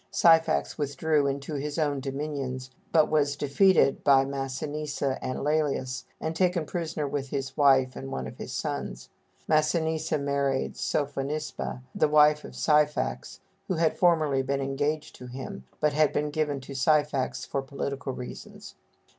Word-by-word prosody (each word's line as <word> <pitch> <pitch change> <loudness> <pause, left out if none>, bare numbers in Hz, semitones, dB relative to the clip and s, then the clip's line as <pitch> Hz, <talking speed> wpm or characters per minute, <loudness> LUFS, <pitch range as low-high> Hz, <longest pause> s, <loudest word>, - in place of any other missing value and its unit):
Syphax 165 -1 +3
withdrew 145 +1 +1
into 140 +2 -3
his 145 +1 -3
own 145 -3 +1
dominions, 135 -2 -4 0.2
but 155 -2 +5
was 145 -2 +1
defeated 145 +2 +3
by 135 -1 +5
Massinissa 140 +1 -3
and 130 - -2
Lælius, 140 -4 0
and 160 +1 -3
taken 180 -2 +1
prisoner 165 -3 -3
with 135 -1 -3
his 135 -1 -4
wife 135 -3 +4
and 135 0 -7
one 65 - -3
of 65 - -9
his - - -6
sons. - - -4 0.4
Massinissa 160 0 +1
married 140 -1 0
Sophonisba, 145 -2 -3
the - - +2
wife 150 0 +5
of - - -10
Syphax, 150 - +1 0.3
who 185 - 0
had 160 -1 +2
formerly 155 -6 +3
been 135 +1 -1
engaged 145 +3 -2
to 125 - -10
him, 125 - -7
but 150 -1 +2
had 155 0 +3
been 150 0 -1
given 145 -2 -1
to 130 - -9
Syphax 145 0 +1
for 140 - -2
political 140 0 -4
reasons. 125 -1 -9
145 Hz, 145 wpm, -27 LUFS, 135-155 Hz, 0.4 s, but